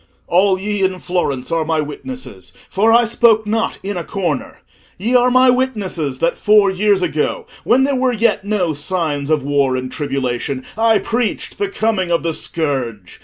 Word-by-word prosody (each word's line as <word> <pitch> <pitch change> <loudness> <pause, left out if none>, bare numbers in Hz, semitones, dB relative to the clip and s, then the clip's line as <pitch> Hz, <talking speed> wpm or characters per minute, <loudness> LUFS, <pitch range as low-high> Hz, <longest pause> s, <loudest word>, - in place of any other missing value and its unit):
"All 185 +1 +2
ye 205 +1 -2
in 190 -1 +1
Florence 175 -8 -2
are 165 -1 +1
my 160 0 0
witnesses, 150 - -7 0.2
for 215 +4 +3
I 235 +1 +5
spoke 225 -1 +3
not 225 +2 -1
in 200 -1 -3
a 175 - -3
corner. 175 -9 -3 0.4
Ye 225 +7 -1
are 250 0 +5
my 255 0 +5
witnesses, 205 - -2
that 170 +5 0
four 210 -2 +4
years 195 0 +2
ago, 155 -3 -1 0.2
when 255 +3 +3
there 280 +1 +1
were 260 0 +1
yet 230 -3 +1
no 200 -5 0
signs 145 -2 -2
of 155 -3 +1
war 140 -2 +1
and 130 0 -4
tribulation, 135 -2 -3
I 225 0 +3
preached 235 +1 -2
the 405 -1 0
coming 220 - -1
of 170 -1 +1
the 165 -1 -1
scourge. 130 - -4
185 Hz, 175 wpm, -18 LUFS, 150-225 Hz, 0.4 s, I